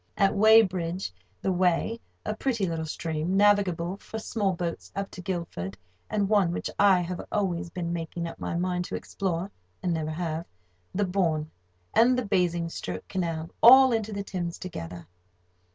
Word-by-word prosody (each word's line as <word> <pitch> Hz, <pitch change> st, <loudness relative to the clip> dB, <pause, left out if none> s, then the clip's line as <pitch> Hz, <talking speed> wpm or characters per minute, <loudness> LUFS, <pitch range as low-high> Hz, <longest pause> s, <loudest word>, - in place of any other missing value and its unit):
At 195 Hz, -1 st, +4 dB
Weybridge, 190 Hz, -, +4 dB, 0.3 s
the 190 Hz, -, +1 dB
Wey 180 Hz, +5 st, +1 dB, 0.3 s
(a 215 Hz, -, -1 dB
pretty 230 Hz, -4 st, 0 dB
little 165 Hz, -2 st, -3 dB
stream, 160 Hz, +3 st, -2 dB
navigable 195 Hz, -3 st, +3 dB
for 220 Hz, -, -8 dB
small 215 Hz, -2 st, -1 dB
boats 170 Hz, -1 st, -4 dB
up 195 Hz, 0 st, -3 dB
to 180 Hz, -, -8 dB
Guildford, 170 Hz, -, -4 dB, 0.3 s
and 205 Hz, -2 st, +1 dB
one 200 Hz, -4 st, +3 dB
which -, -, -3 dB
I 195 Hz, -3 st, +6 dB
have 175 Hz, 0 st, -4 dB
always 180 Hz, -5 st, -1 dB
been 170 Hz, 0 st, -3 dB
making 170 Hz, 0 st, -4 dB
up -, -, -9 dB
my -, -, -3 dB
mind 180 Hz, 0 st, -1 dB
to -, -, -5 dB
explore, 185 Hz, 0 st, -3 dB, 0.3 s
and 180 Hz, -, +1 dB
never 155 Hz, -1 st, -2 dB
have), 160 Hz, 0 st, -3 dB, 0.5 s
the 205 Hz, +1 st, +2 dB
Bourne, 165 Hz, -5 st, 0 dB, 0.4 s
and 250 Hz, +2 st, +5 dB
the 250 Hz, -, -1 dB
Basingstoke 170 Hz, -, -1 dB
Canal 165 Hz, -3 st, -2 dB
all 260 Hz, +1 st, +9 dB
enter 220 Hz, -1 st, -1 dB
the 200 Hz, -1 st, -3 dB
Thames 175 Hz, -3 st, -4 dB
together. 85 Hz, -, -7 dB
180 Hz, 160 wpm, -27 LUFS, 170-200 Hz, 0.5 s, all